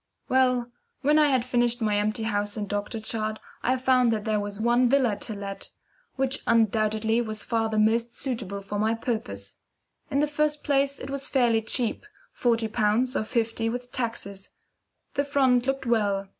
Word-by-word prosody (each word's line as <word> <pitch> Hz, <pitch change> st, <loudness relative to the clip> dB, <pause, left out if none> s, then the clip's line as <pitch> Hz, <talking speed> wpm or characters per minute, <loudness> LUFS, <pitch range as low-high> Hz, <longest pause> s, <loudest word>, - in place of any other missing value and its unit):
Well, 250 Hz, -2 st, +2 dB, 0.3 s
when 300 Hz, +2 st, +4 dB
I 300 Hz, -, +5 dB
had 260 Hz, -4 st, +2 dB
finished 240 Hz, -1 st, +1 dB
my 215 Hz, -3 st, +1 dB
empty 215 Hz, +2 st, -1 dB
house 205 Hz, -1 st, -1 dB
and 205 Hz, -1 st, -3 dB
doctor 205 Hz, +2 st, -3 dB
chart, 215 Hz, 0 st, -2 dB, 0.2 s
I 255 Hz, +1 st, +1 dB
found 255 Hz, -2 st, +3 dB
that 215 Hz, -2 st, -2 dB
there 215 Hz, -1 st, +1 dB
was 205 Hz, 0 st, -5 dB
one 240 Hz, +2 st, +3 dB
villa 255 Hz, -5 st, +3 dB
to 215 Hz, 0 st, -5 dB
let, 200 Hz, -1 st, -7 dB, 0.5 s
which 265 Hz, 0 st, 0 dB
undoubtedly 220 Hz, 0 st, +2 dB
was 215 Hz, -2 st, -3 dB
far 225 Hz, -1 st, 0 dB
the 215 Hz, -, -2 dB
most 230 Hz, +2 st, +2 dB
suitable 225 Hz, -7 st, -2 dB
for 205 Hz, +1 st, -4 dB
my 220 Hz, +2 st, +2 dB
purpose. 100 Hz, -, -4 dB, 0.5 s
In 275 Hz, -, -1 dB
the 295 Hz, -, +4 dB
first 300 Hz, 0 st, 0 dB
place 280 Hz, -1 st, +1 dB
it 270 Hz, -, -7 dB
was 275 Hz, 0 st, -2 dB
fairly 240 Hz, -4 st, +3 dB
cheap 240 Hz, -, -1 dB, 0.2 s
forty 230 Hz, -2 st, +1 dB
pounds, 220 Hz, +4 st, +1 dB
or -, -, +1 dB
fifty 225 Hz, 0 st, -1 dB
with 245 Hz, +1 st, -5 dB
taxes. 200 Hz, -5 st, -3 dB, 0.6 s
The 280 Hz, -, +1 dB
front 265 Hz, -3 st, +2 dB
looked 270 Hz, 0 st, -1 dB
well. 205 Hz, -4 st, +1 dB
230 Hz, 175 wpm, -26 LUFS, 215-255 Hz, 0.6 s, I